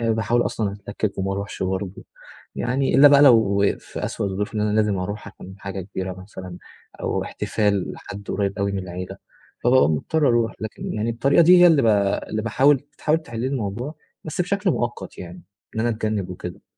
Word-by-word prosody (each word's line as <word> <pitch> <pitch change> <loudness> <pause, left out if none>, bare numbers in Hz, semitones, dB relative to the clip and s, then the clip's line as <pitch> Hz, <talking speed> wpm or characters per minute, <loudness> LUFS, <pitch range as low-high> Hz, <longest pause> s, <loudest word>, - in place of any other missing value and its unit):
باحاول 115 +1 +1
أصلًا 105 -3 -2 0.2
أتلكّك 100 0 -3
وما 95 0 -1
أروحش 100 +1 -4
برضه، 95 +1 -3 0.5
يعني 130 +2 0
إلا 140 +3 +9
بقى 140 0 +6
لو 110 -7 +5
في - - -7
أسوأ - - -2
الظروف 100 +3 -3
إن 105 - -1
أنا 105 0 +1
لازم 105 -3 +2
أروح 105 +3 -5
عشان 95 -1 -12
حاجة 95 0 -5
كبيرة 95 0 -5
مثلًا، 90 -2 -9 0.4
أو - - -1
احتفال 100 -3 -1
لحد 100 0 -10
قريّب 100 0 -1
أوي 100 0 0
من 100 - -2
العيلة، 90 0 -6 0.5
فبابقى 130 +2 +5
مضطر 140 - +1
أروح، 120 -1 +2
لكن 110 -1 -5
يعني 110 +2 -1
الطريقة 140 +8 +3
دي 180 +2 +7
هي - - +9
اللي 160 -5 +5
ب - - +2 0.4
اللي 110 0 -2
باحاول 135 +5 +4 0.2
تحاول 155 +1 +2
تحل 120 -8 -7
لي 125 - -1
الموضوع، 125 +2 -3 0.3
بس 155 +2 -4
بشكل 195 +2 +1
مؤقت 120 - -3
يعني، 90 -1 -9 0.3
إن - - 0
أنا 120 - +1
أتجنّب 110 -4 -2
وكده. 90 -1 -8
105 Hz, 185 wpm, -23 LUFS, 95-125 Hz, 0.5 s, إلا